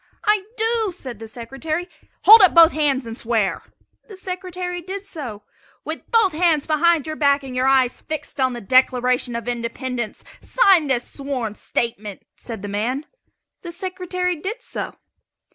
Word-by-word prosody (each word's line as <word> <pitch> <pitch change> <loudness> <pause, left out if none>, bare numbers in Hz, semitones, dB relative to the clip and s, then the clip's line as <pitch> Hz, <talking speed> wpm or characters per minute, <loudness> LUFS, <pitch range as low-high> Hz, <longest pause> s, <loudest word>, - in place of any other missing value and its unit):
"I 420 -2 +2
do," 445 -2 0
said 255 - -8
the 225 - -8
Secretary. 270 +9 -4 0.4
"Hold 440 +2 +10
up 375 -3 +6
both 335 0 +8
hands 280 -4 0
and 225 0 -6
swear!" 225 -5 0 0.5
The 405 -4 -11
Secretary 365 -1 -5
did 385 +3 -7
so. 250 - -7 0.4
"With - - -6
both 450 -5 +4
hands 320 -2 +2
behind 320 0 +2
your 310 0 -4
back 280 -2 +2
and 260 -2 -7
your 255 +1 +1
eyes 260 -2 +3
fixed 310 -2 -6
on 260 -1 +2
the 240 - -6
Declaration 250 +1 +2
of 235 0 -5
Independence 240 -1 -4 0.2
sign 385 -10 +4
this 245 -3 0
sworn 270 -6 -4
statement," 210 -3 -4
said 225 -5 -8
the - - -4
man. 235 +8 -2 0.6
The 345 - -7
Secretary 365 0 -2
did 415 +10 -6
so. - - -5
285 Hz, 160 wpm, -21 LUFS, 245-360 Hz, 0.6 s, Hold